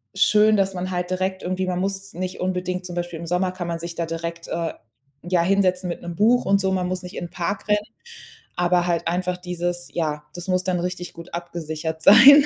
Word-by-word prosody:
schön, 215 0 +5
dass 195 -1 +2
man 185 +1 -3
halt 180 0 -2
direkt 185 +1 -1
irgendwie 185 +1 -1
man 180 -1 -1
muss 195 +1 -3
nicht 185 +1 -4
unbedingt 180 0 -2
zum 175 - -6
Beispiel 175 -1 -3
im 170 - -6
Sommer 180 +2 +1
kann 175 -2 -5
man 170 -1 -2
sich 170 0 -6
da 170 - -1
direkt, 165 +1 -5
äh, 165 -1 -2 0.5
ja, 175 0 +2
hinsetzen 185 -1 +2
mit 170 - -4
'nem 175 -1 -6
Buch 235 +6 +4
und 195 0 +4
so. 190 0 +1
Man 180 -1 0
muss 185 0 -3
nicht 180 +2 -8
in 175 - -4
Park 185 +4 -3
rennen, 210 0 +4 0.8
aber 175 0 +2
halt 170 -1 0
einfach 180 +1 0
dieses 175 -1 -3
ja, 150 -3 -1
das 175 +1 -7
muss 185 0 +1
dann 185 -1 0
richtig 180 0 -4
gut 170 +1 -11
abgesichert 160 -2 -4
sein. 275 +8 +10
180 Hz, 215 wpm, -23 LUFS, 170-185 Hz, 0.8 s, sein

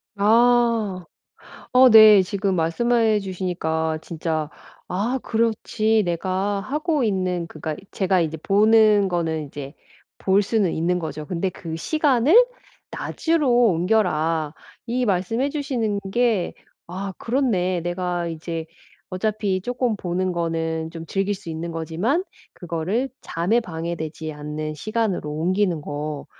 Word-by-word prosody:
아. 225 -3 +3 0.7
어 255 0 +8
네. 215 -3 +9
지금 195 0 -1
말씀해 220 +6 +2
주시니까 165 -4 -2
진짜 160 -2 -3 0.4
아 225 +8 -1
그렇지 220 -1 +1
내가 190 +4 -1
하고 300 - -1
있는 185 -5 -1
그러니까 155 -1 -5 0.2
제가 190 -2 +1
이제 160 -1 -2
보는 210 +2 +4
거는 165 -3 -1
이제 140 +1 -8 0.4
볼 195 +1 +3
수는 200 -3 +1
있는 175 +2 0
거죠. 155 -2 -5
근데 180 +3 -2
"그 165 -2 -7
시간을 290 - +2 0.6
낮으로 320 -5 0 0.2
옮겨라." 165 -4 +1 0.3
이 245 +1 -1
말씀해 220 +8 0
주시는 245 -8 -2
게 235 -6 +1 0.4
아 195 +2 -4
그렇네. 195 -9 0
내가 175 0 -2
이제 165 0 -5 0.4
어차피 200 0 -1
조금 245 +1 -1
보는 185 +1 -1
거는 165 -1 -2
좀 165 0 -8
즐길 195 +4 -1
수 190 -3 -10
있는 165 +1 -4
거지만 175 - -1 0.3
그거를 180 +10 -2
잠에 180 +8 0
방해되지 160 -4 -5
않는 150 +1 -5
시간으로 215 -2 -2
옮기는 175 +2 0
거. 145 0 -5
185 Hz, 250 characters per minute, -23 LUFS, 165-220 Hz, 0.7 s, 네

